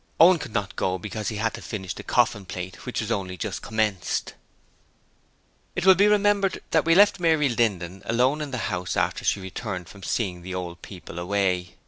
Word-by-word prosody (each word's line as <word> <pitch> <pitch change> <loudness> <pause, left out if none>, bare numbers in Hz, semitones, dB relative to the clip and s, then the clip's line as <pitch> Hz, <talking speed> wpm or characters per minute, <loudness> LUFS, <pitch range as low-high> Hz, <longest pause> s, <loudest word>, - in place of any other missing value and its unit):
Owen 175 +1 +7
could 145 -6 -7
not 105 -2 -2
go 95 0 0
because 105 +2 -5
he 110 - -5
had 110 +2 -1
to - - -8
finish 95 -5 -5
the - - -8
coffin 115 -4 +1
plate, 90 +4 -7
which 125 - -2
was 110 +1 -4
only 95 -4 -2
just - - -4
commenced. 110 -4 -1 1.4
It - - -1
will 190 - +9
be 200 +2 +4
remembered 205 -2 +3
that 160 -1 +3
we 165 0 +5
left 205 0 +6
Mary 160 -4 +3
Linden 95 -6 -1
alone 130 +6 +2
in 150 - -4
the 125 -6 -3
house 90 0 -2
after - - 0
she - - +1
returned 95 -1 -5
from 100 - -13
seeing 95 -3 -2
the 95 +1 -6
old 90 -1 -5
people 90 -2 -9
away. 90 -1 0
105 Hz, 195 wpm, -25 LUFS, 90-140 Hz, 1.4 s, will